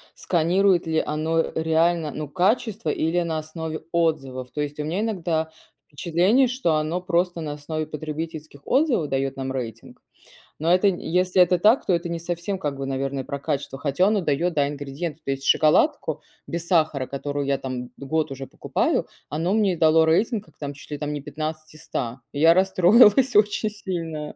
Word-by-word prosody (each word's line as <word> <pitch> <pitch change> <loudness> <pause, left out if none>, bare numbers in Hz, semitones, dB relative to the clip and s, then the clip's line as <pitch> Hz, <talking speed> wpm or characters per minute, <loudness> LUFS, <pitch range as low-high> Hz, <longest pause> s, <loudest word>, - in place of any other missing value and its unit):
сканирует 175 +1 +2
ли 160 0 +1
оно 160 +2 0
реально, 160 0 +1
ну, 155 +1 -5
качество 215 - 0
или 165 +3 0
на 165 -2 -2
основе 155 0 -5
отзывов, 135 -7 -1
то 150 - -3
есть 145 0 -4
у - - -1
меня 170 +6 -1
иногда 170 -7 -1 0.4
впечатление, 180 - +2
что 245 -10 0
оно 155 +4 -1
просто 175 -1 0
на 150 -2 -4
основе 155 +2 -4
потребительских 155 -1 -6
отзывов 255 - +2
даёт 135 0 -1
нам 135 0 -3
рейтинг. 115 -4 -7 0.6
Но 165 +3 +3
это 185 +3 +4
если 180 0 +2
это 180 0 +4
так, 220 +7 +4
то 185 - +2
это 170 0 -1
не 170 - -3
совсем 175 +3 -3
как 145 -5 -2
бы, 135 - -4
наверное, 135 0 -2
про 140 +2 -5
качество, 140 -2 -3
хотя 145 +6 +2
оно 210 -2 +2
дает, 170 +3 0
да, 145 -3 +2
ингредиенты, 145 +3 -5
то 135 - -2
есть 135 0 -4
шоколадку 155 - +3 0.3
без 170 0 -4
сахара, 155 -7 +1
которую 145 +1 -3
я 140 0 +1
там 125 -2 -5
год 150 +1 -2
уже 135 0 -6
покупаю, - - -1 0.2
оно 165 +5 -1
мне 205 -5 +2
дало 160 0 +5
рейтинг, 210 +7 +1
как - - -24
там, 145 -1 -5
чуть 140 - -15
ли 145 - -3
там 150 0 -3
не 145 - -4
15 155 +2 -6
из 155 - -14
100, 125 0 -4
и 140 - -4
я 165 +2 +7
расстроилась 200 +7 +5
очень 210 +1 +3
сильно. 165 -7 -5
160 Hz, 180 wpm, -24 LUFS, 145-180 Hz, 0.6 s, я